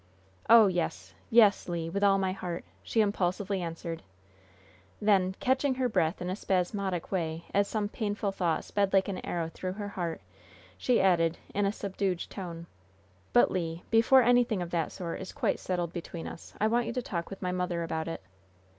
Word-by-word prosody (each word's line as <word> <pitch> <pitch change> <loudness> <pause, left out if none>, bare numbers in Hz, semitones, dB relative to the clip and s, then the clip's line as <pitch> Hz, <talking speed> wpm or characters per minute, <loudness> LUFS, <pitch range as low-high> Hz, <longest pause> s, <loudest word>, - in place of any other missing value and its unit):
"Oh, 230 -1 +9
yes! 180 -4 -2 0.2
Yes, 215 -5 +5
Le! 165 -1 -3
With 200 +3 -1
all 195 -1 +5
my 190 -1 0
heart!" 180 -2 -5 0.2
she 225 - +1
impulsively 195 -1 0
answered. 165 -1 -5 1.0
Then, 190 -3 +3
catching 265 +1 +1
her 255 -1 +1
breath 180 -5 0
in 180 - -3
a - - -1
spasmodic 190 -2 -1
way, 165 -3 -2
as 200 0 +3
some 210 -2 -1
painful 205 -1 -2
thought 175 -4 0
sped 200 -1 0
like 195 -1 +4
an 190 - -4
arrow 170 -2 -2
through 185 0 -4
her 205 0 -5
heart, 170 -4 -3 0.6
she 235 - +2
added, 170 -3 +3 0.2
in 205 0 +1
a - - +1
subdued 195 -3 -2
tone: 170 -3 -6 0.7
"But, 120 - +5
Le, 165 -2 -2
before 235 +3 +6
anything 240 -5 +3
of 170 - -8
that 165 -2 -1
sort 170 -1 -5
is 190 - -6
quite - - 0
settled 175 -2 -2
between 170 -1 -6
us, - - -9
I 215 - +2
want 235 +1 +2
you 235 - -3
to 250 - -1
talk 170 -5 -4
with 195 0 -8
my 180 - 0
mother 180 -2 -1
about 160 -1 -3
it." 165 - -5
190 Hz, 185 wpm, -29 LUFS, 170-205 Hz, 1.0 s, Oh